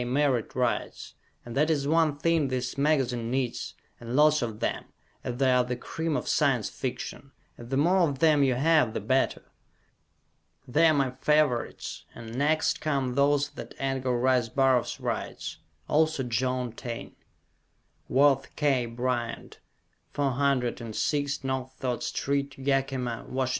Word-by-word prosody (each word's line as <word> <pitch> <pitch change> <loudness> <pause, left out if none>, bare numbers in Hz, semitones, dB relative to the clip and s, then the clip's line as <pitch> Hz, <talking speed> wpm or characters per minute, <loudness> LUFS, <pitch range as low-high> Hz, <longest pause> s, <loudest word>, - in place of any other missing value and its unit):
Merritt 130 -2 0
writes, 125 -2 -2 0.3
and 120 - -8
that 150 +3 +2
is 145 -3 +1
one 155 -2 +2
thing 165 -1 +2
this 130 -1 -3
magazine 135 -5 +1
needs, 130 -1 -2 0.2
and 120 +1 -5
lots 150 +1 +5
of 110 -3 -4
them, - - -2 0.4
as 120 -1 -4
they 135 -1 +3
are 125 0 +4
the 125 0 -3
cream 160 +5 -3
of - - -5
Science - - +2
Fiction, - - -6 0.2
and 120 0 -11
the 135 - 0
more 175 +7 +3
of 140 - -4
them 150 0 +4
you 130 -3 +3
have, 150 -4 +3
the - - 0
better! 130 +6 0 1.2
They 155 +7 +4
are 160 - +5
my 135 -2 +1
favorites, 150 -5 0
and 115 0 -8
next 155 +4 +1
come 135 -5 0
those 145 +1 +2
that 145 - -10
Edgar 130 -2 -1
Rice 125 -1 +2
Burroughs 130 -1 +2
writes; - - -4 0.3
also 155 -2 +2
John 125 +1 -1
Taine. 115 0 -7 0.9
Worth 135 0 +3
K. 135 -5 +1
Bryant, 120 0 -3 0.5
406 140 0 0
No. 130 -1 -1
Third 125 -2 -2
St., 140 -1 -2
Yakima, 135 -3 -1
Wash. 130 0 -1
135 Hz, 140 wpm, -27 LUFS, 125-145 Hz, 1.2 s, lots